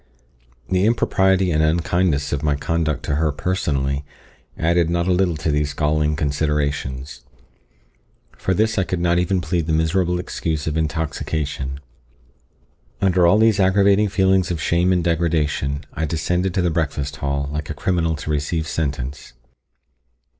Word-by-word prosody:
The 95 +2 +2
impropriety 95 -5 +2
and 80 -1 +2
unkindness 80 -2 +1
of 70 - -1
my 75 -1 +1
conduct 75 0 -1
to 70 - -1
her 80 -1 +1
personally, 70 -3 -1 0.5
added 85 0 +2
not 85 0 0
a - - +2
little 90 -3 +1
to 75 +1 -1
these 75 0 -1
galling 75 0 +1
considerations, 70 -3 -2 1.1
and - - -26
for 95 - +1
this 110 +2 +1
I - - +3
could 90 +1 -3
not 85 0 +2
even 90 +1 0
plead 85 -1 -1
the 80 - 0
miserable 90 +3 +1
excuse 80 -3 -3
of 75 - -2
intoxication. 75 -3 -2 1.2
Under 90 -2 +3
all 85 - +5
these 110 -2 +4
aggravating 100 +2 +4
feelings 95 -1 +2
of 85 -3 -2
shame 85 +4 +2
and 90 -2 +2
degradation, 80 -4 0
I 80 - -2
descended 90 +4 -1
to 95 - +1
the 85 - +1
breakfast 70 -3 -2
hall, 70 0 -2
like 75 0 -4
a 75 - -4
criminal 85 -1 0
to 80 0 -5
receive 75 +2 -1
sentence. 70 -5 -4
80 Hz, 155 wpm, -21 LUFS, 75-90 Hz, 1.2 s, all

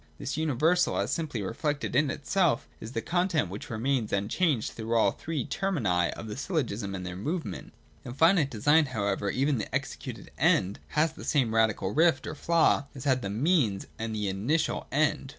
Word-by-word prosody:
This 135 - -4
universal, 160 +4 +2
as - - 0
simply 150 - -2
reflected 145 +7 -2
in 145 +1 +3
itself, 145 -1 +1
is 110 +3 -8
the 115 -2 -2
content 170 - +1
which 100 - -7
remains 120 0 -1
unchanged 115 - 0
through 115 +1 -3
all 115 - +4
the - - -16
three 155 -6 -3
ferw^«'«/ 110 - 0
of - - -8
the 105 -1 -5
syllogism 120 - -2
and 90 -1 -5
their 90 0 -5
movement. 155 - -4 0.3
211.] - - -7
In - - -6
finite 165 -3 +4
design, 145 +7 +3
however, 100 -1 0
even 135 +3 +1
the 105 - -4
executed - - -5
End 95 +3 +2 0.2
has 155 +1 +3
the - - -10
same 125 -7 +1
radical 110 -4 +2
rift 160 -4 +3
or - - -4
flaw 165 -2 +2
as 130 - -7
had 130 -3 +2
the 100 - -3
Means 115 - +1
and 110 0 -3
the 105 -1 -1
initial 110 +12 -1
End. 145 -1 +1
130 Hz, 185 wpm, -28 LUFS, 110-155 Hz, 0.3 s, all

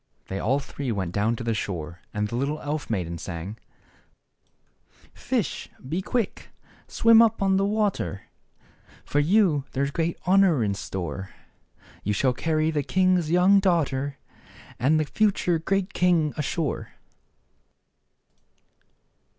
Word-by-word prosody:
They 95 - -3
all 130 +7 +1
three 140 -2 -5
went 95 -5 -2
down 105 +5 +1
to 120 - -6
the 115 -1 0
shore, 85 -5 -4
and 105 0 -1
the 115 - -5
little 140 +5 -1
elf 150 0 -4
maiden 85 -6 -2
sang: 95 +7 -6 0.8
" - - -33 0.2
Fish, - - -1 0.2
be 165 +7 -1
quick, 230 +2 -2 0.4
swim 230 0 +6
up 230 -2 +3
on 195 -1 +2
the 195 - +2
water; 205 - -1 0.8
For 145 - 0
you 165 -2 +3
there's 140 +1 0
great 165 +2 -1
honor 185 -8 +4
in 100 -2 0
store: 95 -1 -5 0.7
You 105 - 0
shall 125 +5 +2
carry 155 +3 0
the 150 -2 0
king's 185 +1 +2
young 180 +4 +5
daughter, 145 -7 0 0.6
And 150 +6 +3
the 155 - +1
future 180 -1 +1
great 195 +4 -1
king 170 -4 +2
ashore." 150 +1 -3
150 Hz, 135 wpm, -25 LUFS, 110-185 Hz, 0.8 s, swim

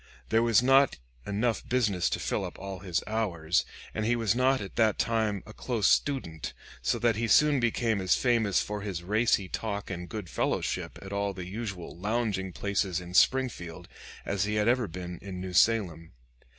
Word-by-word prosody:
There 115 - +3
was 115 0 +4
not 135 +1 +5 0.3
enough 110 +3 -1
business 105 -8 +1
to - - -2
fill - - -1
up - - -6
all 95 -1 -6
his 90 -3 -2
hours, 90 -7 0 0.3
and 110 - -2
he 120 +2 +2
was 115 -4 +1
not 130 +2 +3
at 100 -2 -7
that 110 -2 +3
time 110 -4 0
a 110 - -11
close 115 -5 0
student, 105 - 0 0.3
so - - +1
that 115 -3 +2
he 115 +1 0
soon 150 +3 +5
became 115 -3 +1
as 95 - +3
famous 115 -6 +2
for 105 0 -4
his 95 -4 -4
racy 105 0 +2
talk 100 0 -4
and 90 -1 -5
good 105 -5 -5
fellowship - - -2
at 100 0 -7
all 100 0 -1
the 90 -1 -6
usual 95 -3 -6
lounging 105 -1 -1
places 95 -1 -1
in 90 0 -9
Springfield 90 -8 +1 0.4
as 100 -1 0
he 105 +1 -1
had 105 0 +1
ever 120 -1 +2
been 90 0 -7
in 95 -1 -7
New 90 0 -5
Salem. 90 -6 +2
105 Hz, 185 wpm, -29 LUFS, 95-115 Hz, 0.4 s, not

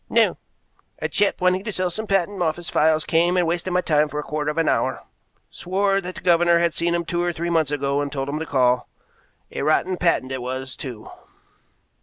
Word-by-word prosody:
"No. - - +3 0.6
A - - -2
chap 205 - +1
wanting 185 +1 +2
to 215 - -4
sell 185 -2 -1
some 220 +5 -5
patent 195 0 0
office 170 +1 -2
files 155 0 +3
came 175 +2 +2
and 180 - +3
wasted 175 +2 -2
my 180 0 +2
time 150 -3 +2
for 150 +1 -4
a - - -3
quarter 150 0 -2
of 150 - -4
an 165 - +1
hour; - - 0 0.5
swore 195 +2 0
that 180 0 -7
the - - -9
governor 170 -1 +4
had 170 -1 +1
seen 170 0 0
him 170 0 -2
two 175 +1 -1
or 175 0 0
three 170 +1 -3
months 160 -4 +2
ago 140 -1 0
and 145 -1 -3
told 135 -1 -3
him 145 +2 -3
to 160 - -3
call. 125 -2 +2 0.6
A - - -4
rotten 165 +5 +1
patent 165 -7 +1
it 130 -1 -3
was, 130 +1 -5
too." 120 -6 -8
170 Hz, 220 wpm, -22 LUFS, 145-180 Hz, 0.6 s, governor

